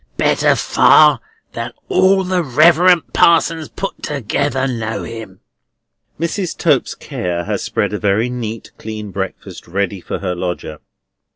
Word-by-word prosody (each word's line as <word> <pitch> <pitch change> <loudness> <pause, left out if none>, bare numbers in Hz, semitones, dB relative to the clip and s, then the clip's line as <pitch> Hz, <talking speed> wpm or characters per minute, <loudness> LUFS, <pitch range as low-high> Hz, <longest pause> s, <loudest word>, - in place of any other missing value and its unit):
Better - - +3
far - - +5 0.3
than - - -5
all 195 - +3
the 185 -1 0
Reverend 170 +5 +4
Parsons 165 -1 +3
put 195 - -6
together 140 0 -1
know 115 -3 -3
him." 110 -5 -9 0.8
Mrs. 170 +2 -2
Tope's 150 -6 +1
care 85 -1 -4
has - - -2
spread - - -2
a 105 - -2
very 105 +3 +1
neat, 115 -3 -6
clean 110 -2 -7
breakfast 95 -1 -6
ready 95 +1 -2
for - - -4
her 90 -2 -3
lodger. 90 -4 -5
120 Hz, 130 wpm, -17 LUFS, 100-165 Hz, 0.8 s, far